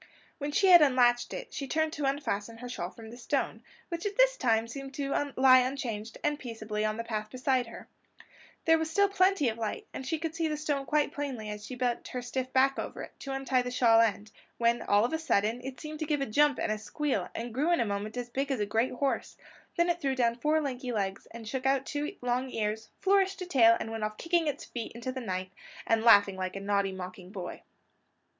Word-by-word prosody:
When 290 0 -3
she 385 +6 +3
had 350 -2 +10
unlatched 245 -4 +4
it, - - -7
she 275 - -4
turned 315 +3 0
to 295 - -2
unfasten 230 -6 -2
her 245 +2 -7
shawl 175 -8 -4
from 220 +2 -12
the 240 - -10
stone, 245 - -2 0.3
which 340 +2 -3
this - - +5
time 230 - +1
seemed 270 +3 -8
to 280 0 -1
lie 260 0 +8
unchanged 235 -4 -3
and 295 0 0
peaceably 220 -4 -4
on 215 0 0
the 230 - -3
path 215 -2 -4
beside 255 0 0
her, 230 - -11 0.8
There 325 0 +5
was 320 0 -2
still 400 +5 +3
plenty 380 -6 +3
of 225 0 -2
light, 220 -2 -3
and - - -5
she 295 +5 -1
could 320 0 -4
see 330 0 0
the 305 -1 -2
stone 290 -2 -2
quite 300 -1 +2
plainly 255 -7 -4
as 210 0 -7
she 255 - -6
bent 245 -1 -1
her 250 - -4
stiff 260 +1 -3
back 270 +1 +3
over - - -5
it, - - -9
to 275 - -6
untie 270 -1 +1
the 250 - -4
shawl 235 -2 +5
end; 215 -1 0 0.3
when, 235 0 +2
all 205 +2 +3
of 245 - -3
a 320 - 0
sudden, 230 -6 +1
it 265 0 -7
seemed 305 -1 -7
to 310 - -3
give 295 -1 +1
a - - +1
jump 285 +4 +3
and - - -1
a 215 - -2
squeal, 255 - -2
and 235 0 -5
grew 295 +8 +1
in 345 - +3
a - - +2
moment 205 +2 -3
as 245 -1 -3
big 275 +3 -1
as 270 -4 -1
a 205 - +1
great 225 +5 0
horse; 270 +2 -2 0.4
then 340 0 +3
it 345 0 0
threw 270 -2 0
down 235 -2 +2
four 300 +6 +1
lanky 255 -3 -3
legs, 195 -3 -2
and 230 -1 -10
shook 265 +3 -2
out 270 0 +2
two 295 +6 -3
long 250 +1 0
ears, 220 -1 -3
flourished 390 0 +3
a - - -5
tail, 235 -9 +5
and 225 - -4
went 225 -1 -4
off 215 0 -3
kicking 335 -1 +1
its 290 -1 -3
feet 235 -2 -6
into 235 +2 -5
the 190 -8 -3 0.4
and 225 -1 +2
laughing 205 -4 +6
like 185 0 -3
a - - -3
naughty 200 0 0
mocking 185 -1 -8
boy. 190 -3 -7
250 Hz, 235 wpm, -30 LUFS, 225-290 Hz, 0.8 s, had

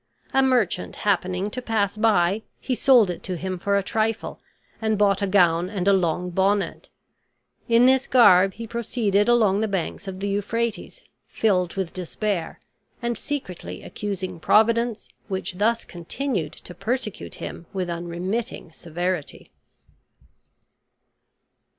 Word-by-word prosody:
A 270 - +5
merchant 245 -9 +1
happening 185 0 0
to 250 - -5
pass 215 -4 0
by, 210 -2 +2 0.2
he 260 - -2
sold 245 -6 +5
it 175 - -7
to 185 -2 -4
him 185 +1 -4
for 200 +2 +1
a 200 - 0
trifle 220 +2 -2 0.4
and 220 -1 +1
bought 200 -1 +3
a 200 - +1
gown 175 -2 +3
and 195 -2 -3
a 200 - +6
long 180 -1 0
bonnet. 195 +3 0 0.8
In 235 +1 +6
this 265 +1 +4
garb 195 -6 +6
he 230 - -6
proceeded 225 -2 0
along 215 -4 +4
the 220 - +1
banks 195 0 -3
of 190 -1 -6
the 200 - -2
Euphrates, 225 - -2 0.3
filled 180 -5 +1
with 190 -3 -3
despair, 185 0 -3 0.4
and 235 -1 -2
secretly 260 - -5
accusing 190 -4 -5
Providence, 230 +4 +2 0.2
which 190 -2 -4
thus 230 +2 +2
continued 175 - -3
to 180 - -11
persecute 215 +4 -3
him 170 - -8
with 185 -2 -2
unremitting 175 +5 -4
severity. 175 0 -4
200 Hz, 135 wpm, -24 LUFS, 180-225 Hz, 0.8 s, a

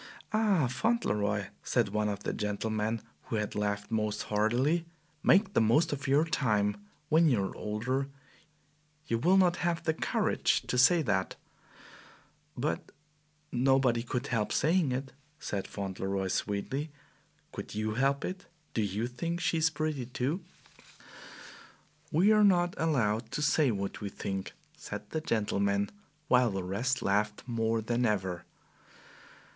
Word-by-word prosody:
"Ah, 210 -8 +3
Fauntleroy," 105 - 0
said 120 -5 +1
one 105 +1 0
of 100 - -4
the - - -2
gentlemen 110 +1 -2 0.2
who - - -3
had 105 -1 -2
laughed 105 0 -2
most 105 -1 -1
heartily, 120 +11 +1 0.4
"make 195 +2 +4
the - - +4
most 145 +9 +3
of 140 0 -4
your 145 +4 +4
time! 105 -10 +1 0.3
When 160 +1 +5
you 115 -7 +2
are - - -6
older 125 +6 -2 1.0
you 115 -6 0
will 180 +9 +4
not 180 -2 +4
have 170 -1 -1
the 160 -1 +1
courage - - +1
to 125 - -1
say 165 +5 +6
that." 95 -6 0 1.2
"But 145 +5 -2 0.6
nobody 130 -1 +3
could 125 +2 -3
help 115 -5 -1
saying 160 -2 +2
it," 130 +1 -3 0.2
said 100 -10 -4
Fauntleroy 95 -1 -3
sweetly. 120 +12 -2 0.6
"Could - - -7
you 110 0 -1
help 135 +4 +1
it? 185 0 -6 0.3
Don't 105 -3 0
YOU 105 +5 -2
think 165 +8 -3
she 175 -1 +1
is 160 0 +4
pretty, 155 -5 -2
too?" 130 +8 -2 1.7
"We 185 +8 +4
are 215 -1 +5
not 175 -3 +4
allowed 115 -8 +1
to 150 - -1
say 150 -1 +3
what 100 -2 -3
we 100 - -3
think," 95 -1 -4 0.2
said - - -8
the 160 - -1
gentleman, 100 -5 0 0.4
while 125 -1 +4
the 95 -2 -3
rest 115 +8 -1
laughed 105 +1 0
more 115 -2 0
than 120 +2 0
ever. 95 -4 -1
120 Hz, 140 wpm, -30 LUFS, 105-155 Hz, 1.7 s, say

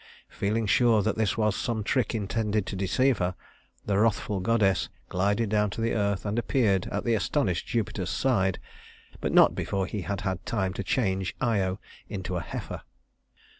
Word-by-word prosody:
Feeling 110 +3 -1
sure 110 +1 +4
that 110 - 0
this 110 -2 0
was 105 -2 +2
some 110 -3 -2
trick 125 +2 0
intended 105 -1 -1
to - - -5
deceive 120 +7 +2
her, 90 0 0 0.5
the 100 -1 +1
wrathful 105 -2 +1
goddess 95 -1 +2 0.2
glided 100 +4 +1
down 105 0 +2
to 100 - -7
the 115 +1 0
earth 100 -2 0
and 105 +3 0
appeared 105 -7 +1
at 100 - -3
the 120 - +1
astonished 105 - 0
Jupiter's 100 -5 -2
side 95 -9 +1 0.6
but - - -1
not - - +6
before 95 -1 -1
he 105 +1 -4
had 100 +1 -3
had 95 -3 -2
time 95 -5 -1
to 100 - -4
change 95 -4 0
Io 100 -6 0 0.3
into 95 -2 -4
a 85 - -1
heifer. - - -6
105 Hz, 170 wpm, -27 LUFS, 95-115 Hz, 0.6 s, not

